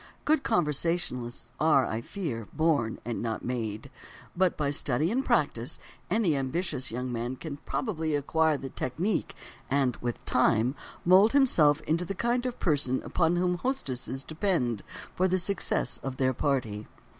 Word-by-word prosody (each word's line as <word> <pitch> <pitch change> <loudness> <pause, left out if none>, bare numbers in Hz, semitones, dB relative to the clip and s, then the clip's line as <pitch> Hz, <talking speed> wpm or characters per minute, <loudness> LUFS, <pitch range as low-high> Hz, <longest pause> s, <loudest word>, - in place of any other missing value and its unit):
Good 310 -1 +3
conversationalists 155 - -1
are, 150 -4 +4
I 110 +1 -2
fear, 120 - -4
born 155 -8 +1
and 120 -1 -3
not 115 -2 -3
made—but 125 - -3
by 145 -2 0
study 145 +4 +1
and 260 +4 +1
practise - - 0 0.3
any 200 -9 +2
ambitious 135 0 -2
young 125 +2 -3
man 120 +2 -3
can 145 +1 -6
probably 160 - -1
acquire 155 +2 +2
the 135 -1 -6
technique, 170 - -2 0.3
and, 135 -2 +2
with 120 -1 -4
time, 125 0 +3 0.3
mould 190 +5 +6
himself 160 - +4
into 165 +3 0
the 195 +3 -4
kind 245 +4 0
of 245 - -4
person 140 -6 +1
upon 170 0 +1
whom 180 0 +1
hostesses 135 - -3
depend 155 - 0 0.3
for 185 - +2
the 185 0 +2
success 185 0 -1
of 135 -1 -5
their 130 -1 +2
party. 115 -7 -1
150 Hz, 145 wpm, -28 LUFS, 125-180 Hz, 0.3 s, mould